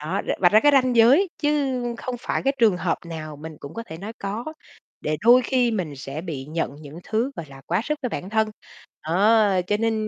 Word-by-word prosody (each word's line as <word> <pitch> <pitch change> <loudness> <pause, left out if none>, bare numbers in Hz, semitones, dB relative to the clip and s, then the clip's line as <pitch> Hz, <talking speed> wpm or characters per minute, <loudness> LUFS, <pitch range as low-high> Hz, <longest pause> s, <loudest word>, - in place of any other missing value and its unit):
Đó, 160 +6 -2
ờ, - - +1
vạch 180 0 +5
ra 215 - +7
cái 290 +3 +5
ranh 255 -3 +3
giới 265 - +6
chứ 285 -4 0 0.2
không 255 -1 -4
phải - - -2
cái 275 - +2
trường 220 -6 +4
hợp 175 -1 -1
nào 155 -2 -7
mình 155 +1 -9
cũng 140 - -9
có 230 - -5
thể 160 - -8
nói 205 +5 -7
"có", 205 +4 -4 0.6
để 155 0 -1
đôi 240 +5 +6
khi 250 -1 +1
mình 180 -10 -3
sẽ 135 +3 -6
bị 160 -6 -6
nhận 155 -3 -3
những 150 +1 -11
thứ, 225 +5 -1
gọi 165 - -6
là, 135 -1 -12
quá 175 +3 +1
sức 300 +3 -2
với 250 - -1
bản 190 -4 -6
thân. 220 0 +1 0.6
Đó, 205 +5 +4 0.2
cho 205 - +1
nên, 225 +1 0
210 Hz, 230 wpm, -23 LUFS, 160-245 Hz, 0.6 s, ra